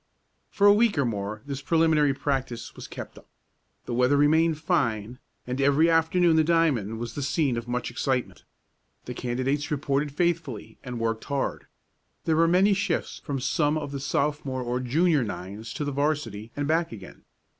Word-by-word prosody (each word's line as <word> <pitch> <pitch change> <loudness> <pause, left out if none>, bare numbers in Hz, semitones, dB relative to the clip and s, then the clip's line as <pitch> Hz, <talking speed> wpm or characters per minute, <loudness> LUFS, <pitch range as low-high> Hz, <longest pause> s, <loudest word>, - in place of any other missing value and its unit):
For 200 - +1
a 205 - +9
week 220 -3 +3
or 140 - +2
more 105 -1 -3
this 140 -1 -5
preliminary 155 -3 +3
practice 135 -4 -3
was - - -9
kept - - -9
up. - - -22 0.6
The - - -4
weather 125 +4 +3
remained 160 +2 +3
fine, 120 - -1 0.3
and 125 +2 -3
every 145 +4 +4
afternoon 165 +1 +3
the 160 - +5
diamond 150 - +1
was 120 +1 -5
the 145 - -4
scene 140 -2 +1
of 115 0 -5
much 125 +1 -2
excitement. 130 -3 -2 0.6
The 125 - -5
candidates 130 +4 -2
reported 145 0 -1
faithfully, 145 - -2
and 125 -2 -5
worked 115 -1 -2
hard. 140 -1 -2 0.6
There 160 - +2
were 165 0 +5
many 190 +4 +4
shifts 195 +1 -2
from 140 -3 -3
some 150 +3 +1
of 145 -2 -4
the 140 - -4
Sophomore 140 -1 -1
or 120 +1 -1
Junior 150 +3 +2
nines 100 +3 -6
to 150 - -2
the 145 - -2
'varsity, 135 -7 -2
and 145 0 -2
back 165 +2 +1
again. 100 -5 -11
140 Hz, 175 wpm, -26 LUFS, 120-160 Hz, 0.6 s, a